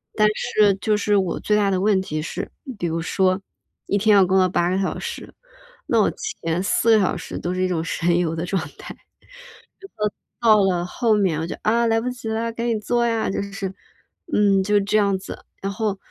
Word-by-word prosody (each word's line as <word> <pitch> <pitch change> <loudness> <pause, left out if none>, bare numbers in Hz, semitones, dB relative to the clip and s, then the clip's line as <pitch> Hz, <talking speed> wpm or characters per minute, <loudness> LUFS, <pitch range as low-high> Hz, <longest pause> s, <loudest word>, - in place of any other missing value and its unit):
但 215 -1 +4
是 210 -1 +2
就 210 +2 0
是 205 0 +2
我 190 -3 -1
最 210 - +1
大 205 -1 +2
的 185 -1 0
问 200 -1 +3
题 155 -4 -4
是， 155 - -5 0.3
比 175 - -1
如 165 0 -2
说 185 +2 +1 0.4
一 200 - 0
天 210 +1 +4
要 195 -2 +6
工 190 +1 +2
作 185 -1 +4
8 175 -1 +1
个 190 - 0
小 190 - -2
时， - - -7 0.5
那 - - +3
我 - - +3
前 180 - -3
4 225 +3 +3
个 - - +3
小 190 - +1
时 - - -7
都 175 - -3
是 185 - -2
一 185 - +2
种 170 -3 -1
神 170 +1 0
游 165 -2 0
的 165 - -3
状 180 -2 -1 0.2
态， - - -9 1.5
然 230 -2 +5
后 205 -2 +5
到 185 - +2
了 175 - -1
后 225 +5 +1
面 190 -7 +1
我 165 - -3
就： - - -5
“啊 235 +2 +2
来 225 0 +2
不 250 - -2
及 250 -2 -7
了， 225 +1 -1
赶 230 +1 -3
紧 225 -3 0
做 240 +2 +1
呀”。 230 -1 0
就 - - -2
是， 195 -1 -5 0.6
嗯 200 -2 +3
就 205 +1 +3
这 205 +2 +1
样 200 -2 +2
子。 190 - -10 0.2
然 195 - -2
后 210 -1 -2
200 Hz, 235 characters per minute, -22 LUFS, 185-215 Hz, 1.5 s, 要